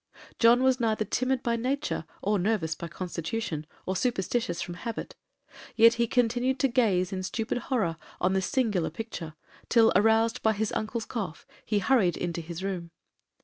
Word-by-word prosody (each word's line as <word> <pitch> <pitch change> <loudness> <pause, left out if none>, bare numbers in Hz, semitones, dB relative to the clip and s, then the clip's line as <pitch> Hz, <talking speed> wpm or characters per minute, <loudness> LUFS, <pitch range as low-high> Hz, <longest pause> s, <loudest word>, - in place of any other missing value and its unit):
John 240 +2 +6
was 260 0 +3
neither 220 -2 +1
timid 255 +4 0
by 235 -2 +1
nature, 260 - -2 0.2
or 205 0 +2
nervous 180 -5 0
by 170 - -7
constitution, 170 -1 -4 0.2
or 190 - -1
superstitious 195 -3 -1
from 175 - -4
habit, 225 +6 -5 0.6
yet 230 0 +7
he 235 - +3
continued 245 +2 +1
to 275 - +4
gaze 205 -7 +2
in 185 - -2
stupid 220 +6 -2
horror 205 -12 -1 0.2
on 185 +1 +2
this 190 -1 0
singular 220 - +1
picture, 165 -4 -7 0.3
till, 225 -1 +5
aroused 225 +3 +3
by 220 - +3
his 215 0 -1
uncle's 220 +1 -2
cough, 195 -9 -5 0.2
he 215 - 0
hurried 200 -5 +3
into 170 -1 -3
his 170 +2 -7
room. 180 -4 -3
220 Hz, 165 wpm, -28 LUFS, 180-235 Hz, 0.6 s, yet